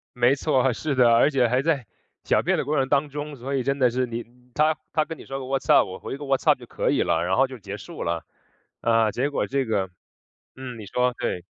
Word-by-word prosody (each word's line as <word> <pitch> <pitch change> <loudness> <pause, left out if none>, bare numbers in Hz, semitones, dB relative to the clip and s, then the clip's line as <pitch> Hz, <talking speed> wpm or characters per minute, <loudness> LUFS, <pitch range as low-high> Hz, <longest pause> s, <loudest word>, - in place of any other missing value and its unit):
没 125 +3 +4
错， 135 -3 +2
是 150 +3 -2
的， 120 -2 +5
而 130 +6 +5
且 125 -3 +3
还 125 +3 +2
在 140 -9 0 0.4
小 - - +2
便 - - +2
的 - - 0
过 150 +1 0
程 135 -1 +2
当 145 +1 +1
中， 145 +1 -6
所 135 +2 -4
以 130 - 0
真 140 +1 -1
的 125 -1 +5
是 125 +1 0
你 120 0 -5 0.3
他 155 +1 +2 0.2
他 155 - +3
跟 165 0 -7
你 - - -12
说 135 0 -5
个： 130 - -6
“What’s 135 0 -2
up？”， - - +6
我 95 - -7
回 135 - -6
个： 145 - -7
“What’s 135 -1 0
up？” - - +5
就 - - -11
可 - - -1
以 - - +2
了， 80 +1 +1
然 95 - +1
后 135 0 +4
就 130 -1 -9
结 100 -1 -7
束 90 - -8
了。 85 -1 -2 0.6
啊， 115 -2 +3
结 135 +6 -1
果 - - -1
这 135 -1 0
个 100 -4 -1 0.7
嗯， 125 -3 -7
你 105 - -9
说， 125 +3 0
对。 90 - -2
130 Hz, 325 characters per minute, -24 LUFS, 115-140 Hz, 0.7 s, up